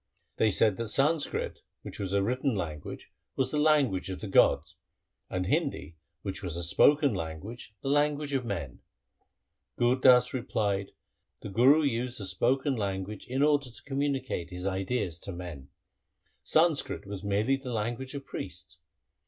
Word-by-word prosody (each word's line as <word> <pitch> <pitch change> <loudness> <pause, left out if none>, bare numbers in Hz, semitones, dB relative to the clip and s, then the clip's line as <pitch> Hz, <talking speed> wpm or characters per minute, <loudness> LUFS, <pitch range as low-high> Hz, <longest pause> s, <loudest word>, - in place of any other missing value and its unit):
They 110 - +4
said 105 0 +3
that 115 - -3
Sanskrit, 145 +7 +1 0.2
which - - -9
was 95 -2 -3
a 100 0 +2
written 125 +3 0
language, 80 -6 -6 0.2
was 130 -1 0
the 150 - 0
language 145 -12 +3
of 95 - -5
the 110 - -5
gods, 95 - +3 0.5
and 90 0 -2
Hindi, 80 -3 -1 0.3
which 95 0 -4
was 85 -4 -3
a 85 - -3
spoken 145 - +4
language, 95 +7 -6
the - - -4
language 145 0 +1
of 135 -2 +1
men. 85 - -5 1.0
Gur 120 +1 +4
Das 125 -1 +5
replied, 105 -6 -1 0.2
' - - -52
The - - -6
Guru 130 +10 +5
used 125 -2 -1
the 100 - -4
spoken 130 +8 +1
language 100 -1 -4
in 130 +3 0
order 145 -3 +3
to 120 - -13
communicate 135 -10 -2
his 90 0 -7
ideas 95 -2 -1
to 100 - -6
men. 85 -7 -8 0.7
Sanskrit 155 -9 +1
was 100 -1 -7
merely 105 +6 +1
the 135 -2 -6
language 120 +5 -3
of 140 -1 -6
priests. 85 -2 -8
115 Hz, 160 wpm, -29 LUFS, 95-135 Hz, 1.0 s, Das